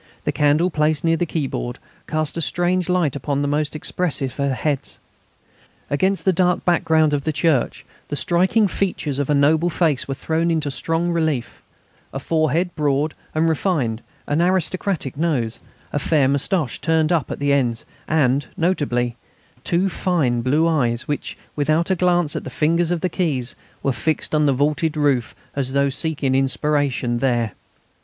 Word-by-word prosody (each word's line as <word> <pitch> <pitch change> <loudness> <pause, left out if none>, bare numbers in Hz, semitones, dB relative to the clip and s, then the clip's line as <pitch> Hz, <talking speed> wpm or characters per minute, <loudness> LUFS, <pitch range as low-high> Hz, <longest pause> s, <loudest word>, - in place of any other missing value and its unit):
The - - 0
candle 150 +4 +2
placed 155 -1 +1
near 165 0 +3
the 170 +1 -1
keyboard 130 - -3 0.3
cast 155 -1 -1
a 165 - -2
strange 175 +2 0
light 175 -6 +1
upon 140 +1 -1
the - - 0
most 150 +1 -1
expressive 150 -4 -2
of 140 0 +1
heads. 140 +1 -2 0.9
Against 190 +7 +1
the 190 - +4
dark 180 0 +1
background 160 -3 +3
of 140 -1 0
the 155 - 0
church 155 -4 0 0.2
the - - -3
striking 185 +7 +2
features 165 -7 -2
of 145 - -1
a 150 - +3
noble 155 +4 +3
face 160 -5 +1
were 135 - -3
thrown 160 +4 0
into 155 -3 0
strong 165 +5 -1
relief: 160 -7 -1 0.5
a - - -5
forehead 160 +4 0
broad 150 0 +1 0.2
and 160 +1 +2
refined, 145 - 0 0.2
an 145 +3 +1
aristocratic 180 -4 0
nose, 140 -9 -1 0.3
a 145 - +1
fair 145 -2 +2
moustache 140 +1 0
turned 160 -1 +2
up 165 -7 +1
at - - -4
the 145 0 +1
ends, 120 -5 0 0.2
and, 140 -3 +2
notably, 125 -9 0 0.5
two 175 +7 +1
fine 160 -10 0
blue 145 +7 +2
eyes, 125 -7 0
which, 145 - -3 0.2
without 155 +4 +1
a - - +3
glance 175 -3 +1
at - - -3
the - - -6
fingers 165 +2 +1
on 175 - +1
the - - +1
keys, 145 -8 -2 0.3
were 135 - +1
fixed 155 +9 -2
on 150 -1 +3
the - - +4
vaulted 150 +4 0
roof 140 -6 +1 0.2
as 135 -2 -1
though 140 0 +2
seeking 140 -1 0
inspiration 135 -2 +1
there. 120 -4 +1
150 Hz, 165 wpm, -21 LUFS, 140-170 Hz, 0.9 s, the